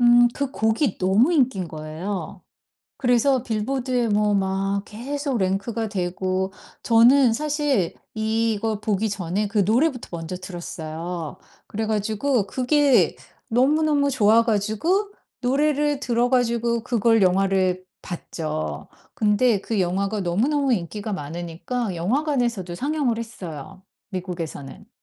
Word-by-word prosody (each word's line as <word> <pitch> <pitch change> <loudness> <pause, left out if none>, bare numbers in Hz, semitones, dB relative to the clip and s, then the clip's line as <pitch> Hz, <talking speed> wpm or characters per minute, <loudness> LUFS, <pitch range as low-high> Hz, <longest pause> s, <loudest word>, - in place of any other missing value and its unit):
음 240 0 +6
그 280 -2 -2
곡이 220 0 +1
너무 195 - +3
인기인 250 - +2
거예요. 160 +6 -6 0.5
그래서 250 0 +2
빌보드에 245 +1 -1
뭐 210 0 +2
막 195 0 0
계속 275 +4 -3
랭크가 200 +4 -1
되고. 185 0 -2 0.3
저는 240 +2 +5
사실 290 - 0 0.2
이거 220 -1 0
보기 215 0 0
전에 200 +1 -2
그 210 +1 -2
노래부터 245 - +2
먼저 165 +1 -5
들었어요. 170 -2 -6 0.3
그래 220 +2 -3
가지고 215 +2 0
그게 270 +4 +3 0.3
너무너무 285 +3 +3
좋아 225 -2 +4
가지고 235 - 0 0.3
노래를 290 +2 +1
들어 240 -2 +1
가지고 235 -2 +1
그걸 230 -2 +2
영화를 185 0 +2 0.2
봤죠. 155 -3 -5 0.3
근데 210 0 +2
그 220 -2 -1
영화가 195 +4 0
너무너무 255 - +1
인기가 205 +2 -3
많으니까 175 - -4
영화관에서도 235 - 0
상영을 275 - 0
했어요 190 -5 -8 0.3
미국에서는. 180 -1 -6
220 Hz, 275 characters per minute, -23 LUFS, 190-250 Hz, 0.5 s, 음